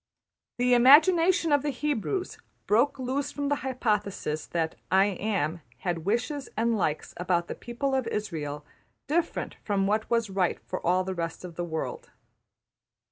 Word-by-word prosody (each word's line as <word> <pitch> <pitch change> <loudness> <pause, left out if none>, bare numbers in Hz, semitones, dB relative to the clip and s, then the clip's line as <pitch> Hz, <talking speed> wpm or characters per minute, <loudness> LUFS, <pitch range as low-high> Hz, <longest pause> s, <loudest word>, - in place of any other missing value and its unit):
The 250 0 +3
imagination 330 +7 +6
of 290 -1 +4
the 295 - -1
Hebrews 295 - -2 0.3
broke 245 +7 +3
loose 270 +2 -2
from 285 -1 -2
the 290 - +1
hypothesis 210 - -2
that 165 -2 -1 0.2
``I 195 +1 +4
Am'' 175 -6 -1 0.2
had 170 -3 -2
wishes 245 +7 -1
and 230 +1 +2
likes 155 -7 -1
about 175 -1 0
the - - -4
people 255 +4 -3
of 265 -2 +1
Israël 155 -10 -3 0.4
different 330 +3 -1
from 200 -2 +1
what 215 +2 0
was 230 -4 +1
right 190 -2 0
for - - -5
all 180 +2 +2
the 190 0 -3
rest 170 0 -4
of 175 - -8
the 175 - -3
world. 160 -2 -4
220 Hz, 155 wpm, -27 LUFS, 180-275 Hz, 0.4 s, imagination